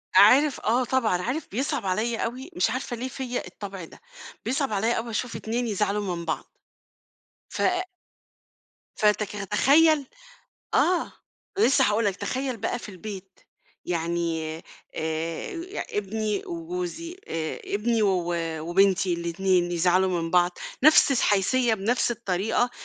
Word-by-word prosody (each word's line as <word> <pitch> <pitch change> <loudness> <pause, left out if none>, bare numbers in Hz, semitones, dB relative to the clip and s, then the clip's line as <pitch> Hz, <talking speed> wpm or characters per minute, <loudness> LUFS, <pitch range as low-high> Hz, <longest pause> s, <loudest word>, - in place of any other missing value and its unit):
عارف، 285 +1 +6
آه 240 +4 +2
طبعًا، 225 -8 +1
عارف 270 - -3
بيصعب 245 -2 -2
عليَّ 220 +5 0
أوي 255 +7 -4
مش 360 - +2
عارفة 255 -1 -3
ليه 250 +3 -4
فيّا 250 -5 -4
الطبع 195 0 -8
ده، - - -16 0.4
بيصعب 265 -1 0
عليَّ 225 +4 +1
أوي 230 +1 -3
أشوف 230 +2 -3
اتنين 235 +2 -2
يزعلوا 205 -2 -1
من 170 - -6
بعض. 160 - -2 1.0
ف - - -4 1.3
فتك- 210 -2 +1
تخيّل، 300 - +4 0.7
آه، 360 0 +2 0.5
لسّه 275 -8 +5
هاقول 210 +2 +2
لك 200 -2 0
تخيّل 255 +4 -3
بقى 220 - -2
في 230 - -10
البيت، 190 0 -9 0.4
يعني 165 -2 -2
آآ، - - -15 0.3
آآ، 165 - -4
ابني 215 - -2
وجوزي 345 0 -5
آآ، 160 -1 -3
ابني 220 +2 0
و 180 -3 +1 0.3
وبنتي 185 +1 +3
الاتنين 175 +1 0
يزعلوا 180 +1 +2
من 165 - -3
بعض، 175 0 +2 0.3
نفس 310 -2 +7
الحيثية 230 +1 +2
بنفس 225 +5 0
الطريقة، 225 +2 0
210 Hz, 130 wpm, -26 LUFS, 180-255 Hz, 1.3 s, نفس